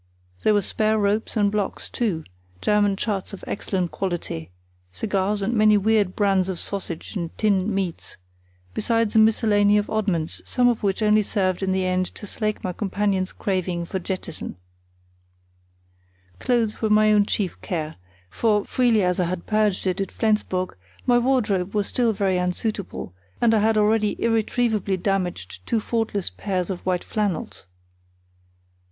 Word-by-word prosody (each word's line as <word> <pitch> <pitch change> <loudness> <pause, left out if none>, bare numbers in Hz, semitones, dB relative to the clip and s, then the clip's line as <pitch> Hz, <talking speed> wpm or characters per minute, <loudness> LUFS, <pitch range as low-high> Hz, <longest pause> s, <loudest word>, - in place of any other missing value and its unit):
There 215 - +3
were 205 - +2
spare 215 +3 +1
ropes 210 +2 0
and 205 -1 +3
blocks, 205 -2 -2
too; 195 -10 -1 0.4
German 205 - +2
charts 200 -1 -3
of 200 - -9
excellent 185 -3 -2
quality; 170 - -4 0.4
cigars 200 - -1
and 220 +5 0
many 215 -2 +5
weird 205 -2 +2
brands 195 -3 +2
of 180 -3 -3
sausage 190 -2 -4
and 170 -4 -4
tinned 200 -3 +2
meats, 195 -4 -3 0.6
besides 230 -1 0
a - - +7
miscellany 210 -2 +4
of 205 - -1
oddments, 190 -7 -1
some 245 -1 +2
of 240 -2 +1
which 200 +1 0
only 215 0 +5
served 190 -3 0
in 190 -1 0
the 190 0 +1
end 185 0 +1
to - - -7
slake 215 +1 -3
my 185 - -2
companion's 195 -1 -1
craving 180 -3 -2
for 190 +2 -3
jettison. 180 -3 -4 1.8
Clothes 235 -4 0
were 220 - +1
my 215 0 +5
own 205 -1 +4
chief 195 -4 -2
care, 160 -4 -3 0.3
for, 210 - +1
freely 235 -5 +2
as 180 +1 +1
I 180 - +2
had 170 0 -4
purged 215 -3 +1
it 185 +1 0
at 195 - -3
Flensburg, 210 -4 0 0.3
my 240 -1 +4
wardrobe 215 -7 +1
was 205 -1 +2
still 240 +1 +1
very 195 -3 +1
unsuitable, 180 - -3 0.3
and 230 -1 +4
I 220 - +4
had 220 +1 +2
already 215 0 +2
irretrievably 225 -3 +1
damaged 175 - -2
two 225 - +1
faultless 215 - -1
pairs 185 - -2
of 180 0 -6
white 180 -1 +1
flannels. 180 - -3
205 Hz, 155 wpm, -23 LUFS, 185-215 Hz, 1.8 s, a